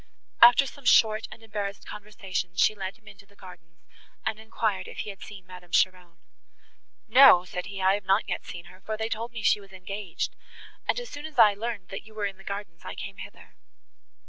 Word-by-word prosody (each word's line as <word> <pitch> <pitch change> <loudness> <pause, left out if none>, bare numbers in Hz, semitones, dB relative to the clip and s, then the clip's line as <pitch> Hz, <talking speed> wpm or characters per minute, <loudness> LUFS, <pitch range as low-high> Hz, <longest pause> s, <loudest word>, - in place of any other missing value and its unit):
After 240 +4 +8
some 275 0 -11
short 220 -2 +5
and 225 +1 -12
embarrassed 205 -2 -5
conversation, 195 -3 -5
she 195 - +4
led 195 -1 -6
him 220 -1 -29
into 200 -1 -14
the 200 - -24
gardens, 175 -3 -15 0.4
and 215 - -1
enquired 220 -2 -2
if - - -6
he 210 - -5
had 195 - -15
seen 195 -3 -10
Madame 180 -1 -12
Cheron. 180 -2 +1 0.9
"No," 230 -7 +8
said 180 0 -5
he, 195 -1 -5
"I 190 +1 +5
have 205 -1 -3
not 195 +3 +2
yet - - -3
seen 170 -1 -9
her, 185 +2 -16
for 215 +3 -4
they 220 +1 -2
told 230 +2 -4
me 230 -2 -7
she 205 - +3
was 195 -1 -16
engaged, 190 0 -5 0.5
and - - +1
as 485 - -8
soon 290 +2 -6
as 315 - -15
I 210 -1 +7
learned 210 -2 -5
that 195 - -6
you 215 - -16
were 210 -1 -2
in 195 -1 -4
the 195 - -15
gardens, 200 -4 -6
I - - -7
came 195 0 -7
hither." - - -11
200 Hz, 215 wpm, -27 LUFS, 185-220 Hz, 0.9 s, After